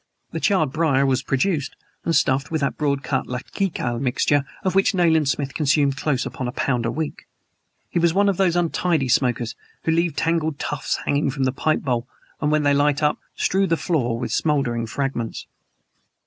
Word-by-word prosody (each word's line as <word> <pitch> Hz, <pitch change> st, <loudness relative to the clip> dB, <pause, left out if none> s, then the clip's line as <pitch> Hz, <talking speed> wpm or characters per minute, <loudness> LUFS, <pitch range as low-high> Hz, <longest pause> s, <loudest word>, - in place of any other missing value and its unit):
The -, -, -3 dB
charred 185 Hz, -, +2 dB
briar 140 Hz, -3 st, +2 dB
was 130 Hz, -1 st, +2 dB
produced 145 Hz, +3 st, -1 dB, 0.3 s
and 165 Hz, -, 0 dB
stuffed 135 Hz, +1 st, +2 dB
with 160 Hz, -, -1 dB
that 140 Hz, -, 0 dB
broad 140 Hz, -2 st, 0 dB
cut -, -, -1 dB
Latakia 125 Hz, -1 st, -2 dB
mixture 135 Hz, +2 st, +1 dB, 0.2 s
of 185 Hz, -, 0 dB
which 195 Hz, +1 st, +3 dB
Nayland 160 Hz, -5 st, +3 dB
Smith 140 Hz, 0 st, -1 dB
consumed 145 Hz, -2 st, +2 dB
close 135 Hz, -2 st, -1 dB
upon 130 Hz, -6 st, -4 dB
a -, -, -2 dB
pound 120 Hz, -2 st, 0 dB
a -, -, -1 dB
week. 155 Hz, +3 st, -4 dB, 0.6 s
He -, -, -1 dB
was 170 Hz, 0 st, +3 dB
one 200 Hz, +4 st, +3 dB
of 195 Hz, -3 st, +1 dB
those 185 Hz, -3 st, +2 dB
untidy 170 Hz, -4 st, +1 dB
smokers 120 Hz, -2 st, +1 dB, 0.3 s
who 160 Hz, -, +1 dB
leave 170 Hz, 0 st, +1 dB
tangled 160 Hz, -2 st, 0 dB
tufts 145 Hz, -1 st, -2 dB
hanging 145 Hz, 0 st, +1 dB
from 135 Hz, 0 st, -2 dB
the 130 Hz, -, +2 dB
pipe 155 Hz, +4 st, 0 dB
bowl 125 Hz, -3 st, -1 dB, 0.3 s
and 150 Hz, -, +1 dB
when 155 Hz, 0 st, +2 dB
they 145 Hz, 0 st, +4 dB
light 145 Hz, +1 st, +2 dB
up 150 Hz, -, +2 dB, 0.2 s
strew 195 Hz, +1 st, +1 dB
the 165 Hz, -, +1 dB
floor 125 Hz, -11 st, 0 dB
with 120 Hz, -, -4 dB
smoldering 120 Hz, -7 st, 0 dB
fragments. 135 Hz, -2 st, -3 dB
145 Hz, 190 wpm, -22 LUFS, 130-165 Hz, 0.6 s, they